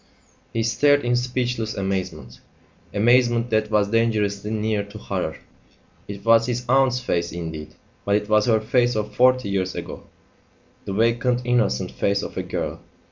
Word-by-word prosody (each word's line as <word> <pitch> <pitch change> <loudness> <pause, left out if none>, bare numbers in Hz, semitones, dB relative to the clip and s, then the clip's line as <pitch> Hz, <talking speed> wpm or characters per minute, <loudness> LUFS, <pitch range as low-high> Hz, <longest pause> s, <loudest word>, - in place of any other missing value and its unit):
He 115 - -1
stared 145 +5 +3
in 120 0 +2
speechless 125 -2 -2
amazement 95 -10 -4 0.5
amazement 120 +2 +3
that 110 -1 +1
was 105 -2 +1
dangerously 105 -3 0
near 110 -1 -1
to 100 +1 -11
horror. 90 -6 -4 0.7
It 100 +1 -8
was 115 0 +5
his 125 0 -2
aunt's 130 -1 +3
face 85 -8 -1
indeed, 80 -2 -7 0.3
but 100 - +1
it 105 0 -1
was 105 +2 +3
her 110 -2 +3
face 120 +2 +1
of 105 -1 -3
forty 130 +1 +3
years 95 -1 -1
ago, - - -7 0.8
the 100 - -4
vacant 115 +3 +1
innocent 120 - +1
face 100 0 0
of - - -7
a - - -1
girl. - - -4
110 Hz, 155 wpm, -23 LUFS, 100-120 Hz, 0.8 s, was